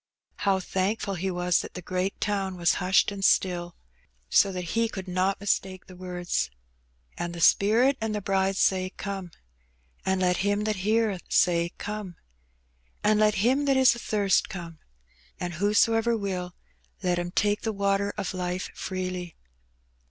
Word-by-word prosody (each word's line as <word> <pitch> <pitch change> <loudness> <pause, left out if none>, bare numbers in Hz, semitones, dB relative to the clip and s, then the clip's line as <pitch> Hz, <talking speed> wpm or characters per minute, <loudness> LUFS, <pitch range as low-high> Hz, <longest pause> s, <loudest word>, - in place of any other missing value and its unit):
How 195 -1 +1
thankful 195 +2 -1
he 190 +1 -2
was 180 -1 +1
that - - -7
the 180 - -5
great 185 +2 -2
town 195 -3 -1
was 175 0 +3
hushed 190 +3 +3
and 200 -1 -6
still, 175 -3 +2 0.6
so 195 - +5
that 180 -1 -4
he - - -6
G - - -7
82 - - -3
Hbb - - -4
Benny. 230 0 +2
could 190 -3 -7
not 185 +2 0
mistake 190 -2 -1
the 185 - -13
words. 175 - -2 0.7
'^And 175 0 -3
the 170 - -7
Spirit 230 +10 +4
and 220 -1 -1
the - - -1
Bride 195 0 +1
say. 185 -1 +2
Come. 195 -3 -5 0.7
And 190 0 0
let 180 -1 +2
him 205 +1 0
that 215 -1 -1
heareth 210 -1 0
say. 170 -1 +2
Come. 205 -4 -5 0.9
And 210 0 +3
let 215 0 +4
him 270 +4 +3
that 275 -1 +3
is 260 -2 +6
athirst 205 -4 +1
come. 170 -5 -8 0.6
And 175 0 -3
whosoever 225 +5 +2
will, 185 -4 -4 0.5
let 180 -1 +1
him 175 0 -3
take 205 +3 +1
the 225 - -1
water 200 0 0
of - - -3
life 180 0 -3
freely." 185 -2 -4
190 Hz, 170 wpm, -27 LUFS, 180-210 Hz, 0.9 s, is